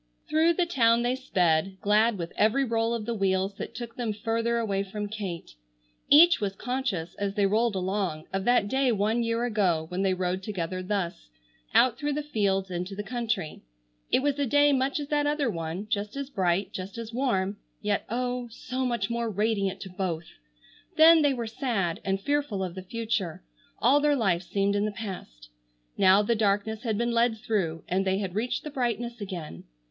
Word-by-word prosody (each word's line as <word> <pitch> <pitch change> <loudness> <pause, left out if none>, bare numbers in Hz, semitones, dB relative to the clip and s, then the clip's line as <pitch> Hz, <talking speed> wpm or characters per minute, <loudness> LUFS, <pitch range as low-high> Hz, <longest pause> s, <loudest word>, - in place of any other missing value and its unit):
Through 320 +2 +3
the 355 +1 +1
town 235 -7 +3
they 245 +1 +1
sped, 185 -7 +1
glad 215 +2 +3
with 170 -1 -5
every 225 +6 +3
roll 230 0 0
of 220 -2 -4
the 235 - -2
wheels 195 -1 0
that - - -6
took 235 -1 -7
them 235 -4 -1
further 230 +2 -1
away 200 -4 0
from 205 +1 -4
Kate. 200 -5 -6 0.6
Each 335 +1 +7
was 195 -1 -2
conscious, 245 -9 -3
as 200 -1 -2
they 205 - +3
rolled 220 +2 +2
along, 185 -4 -2
of 195 0 -1
that 245 -4 +3
day 265 +2 +2
one 220 +2 +1
year 230 +1 0
ago 190 -9 +1
when 180 +1 -2
they 190 -1 +2
rode 185 0 -1
together 185 -3 -4
thus, 185 - -3 0.5
out 250 -2 +4
through 295 -1 -1
the 300 +1 -2
fields 195 -8 0
into 180 +2 -4
the 205 - -4
country. 230 -8 -3 0.5
It 260 - +3
was 285 0 0
a 280 - +1
day 290 +3 +4
much 270 +2 +1
as 290 - -5
that 295 -1 +1
other 290 -5 +1
one, 165 +2 -4
just 210 0 -2
as 280 0 -5
bright, 190 -2 0
just 190 +4 -6
as 230 0 -6
warm, 205 -6 0 0.2
yet 205 -1 0
oh, 245 +1 -2
so 255 +3 -3
much 235 -4 -1
more 235 -1 -1
radiant 200 -2 0
to 190 - -7
both! 180 -3 -3 0.7
Then 320 +1 +8
they 285 -2 +3
were 235 -2 -3
sad 220 - -2
and 195 0 0
fearful 280 -5 -1
of 180 -2 -4
the 185 - -7
future. 200 - -3 0.3
All 260 +6 +4
their 295 0 +3
life 190 -9 +1
seemed 200 +2 0
in 205 +1 +1
the 215 - -1
past. 180 - -8 0.5
Now 190 +2 +5
the 235 - +2
darkness 215 0 0
had 220 -4 -1
been 235 +1 0
led 235 -1 +2
through, 185 -7 -2
and 185 +2 +1
they 190 0 +1
had 195 -3 -3
reached 225 +5 -2
the 300 - -6
brightness 240 -3 -2
again. 175 - -7
215 Hz, 195 wpm, -27 LUFS, 190-240 Hz, 0.7 s, Then